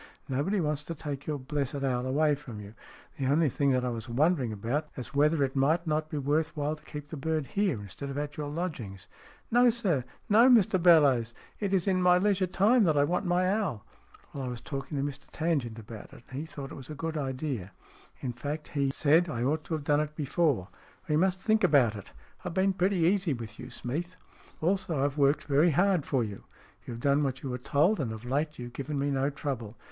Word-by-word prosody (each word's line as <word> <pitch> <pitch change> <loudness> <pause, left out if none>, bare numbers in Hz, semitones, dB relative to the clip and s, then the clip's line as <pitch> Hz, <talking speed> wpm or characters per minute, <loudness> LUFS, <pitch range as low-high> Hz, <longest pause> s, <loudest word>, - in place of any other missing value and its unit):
Nobody 145 +10 0
wants 150 -3 -1
to 165 - -5
take 145 -2 -6
your 150 -1 -1
blessed 140 0 -3
owl 125 -1 0
away 150 +3 +3
from 130 -7 -7
you. 105 0 -10 0.5
The 135 - 0
only 150 +2 +3
thing 140 +3 +1
that 125 -1 +2
I - - 0
was 115 0 -5
wondering 135 0 +2
about 120 +9 -2
was 125 - -7
whether 150 +1 +3
it 135 0 -2
might 155 +6 +2
not 155 -1 -1
be 150 - -4
worth 150 +3 0
while 150 +1 -1
to 150 - -20
keep 150 -1 -8
the 155 - -6
bird 155 +1 -1
here, 195 - 0
instead 105 +8 -7
of 140 - -5
at 145 0 -3
your 150 -1 -4
lodgings." 145 - -5 0.2
" - - -28
No, 245 +1 +6
sir! 195 - 0 0.2
No, 230 +5 +6
Mr 200 -7 +5
Bellowes! 140 -9 +5 0.2
It 200 -2 -1
is 190 -3 +2
in 185 -2 +2
my 180 0 +5
leisure 195 -1 +2
time 205 +7 +4
that 155 -3 +2
I 145 - +5
want 180 +5 0
my 180 +1 +2
owl." 195 - -1 0.5
"Well, 140 - -4
I - - -3
was 120 -1 -5
talking 140 +2 -5
to 135 - 0
Mr 140 -1 -5
Tangent 145 -9 -1
about 110 -1 -10
it, - - -14
and 130 - -4
he 160 - -5
thought 140 -4 -8
it - - -7
was 130 - -13
a 155 - -6
good 165 +2 -4
idea; 130 - -3 0.5
in 125 -2 -3
fact, 150 +5 -5
he 140 -2 0
SMEATH 135 - -4
37 160 +4 +4
said - - -9
I 120 -4 -2
ought 150 +4 0
to 165 - -2
have 155 - -5
done 145 0 +2
it 150 0 -3
before. 145 - 0 0.4
We 150 - +1
must 185 +3 +2
think 220 +3 +2
about 125 -7 +4
it. 100 - -10 0.3
I - - -25
have 180 - -4
been 190 +1 +3
pretty 190 +1 +1
easy 175 0 +2
with 115 -2 -9
you, - - -8
Smeath." 170 +9 -4 0.3
" - - -26
Also, 170 -5 +1
I've 145 +1 -2
worked 140 +1 +3
very 150 +4 +3
hard 180 0 +2
for 130 -3 +1
you." 105 -3 -7 0.2
" - - -30
You've 115 -1 -6
done 140 +2 +3
what 135 -2 -2
you 135 - -3
were 125 - -4
told, 150 - +2
and 125 -6 -1
of 110 +1 -8
late 150 +4 -1
you've 120 0 -7
given 140 +2 -4
me 140 +1 0
no 135 +1 +1
trouble. 130 -7 -5
145 Hz, 240 wpm, -29 LUFS, 130-170 Hz, 0.5 s, No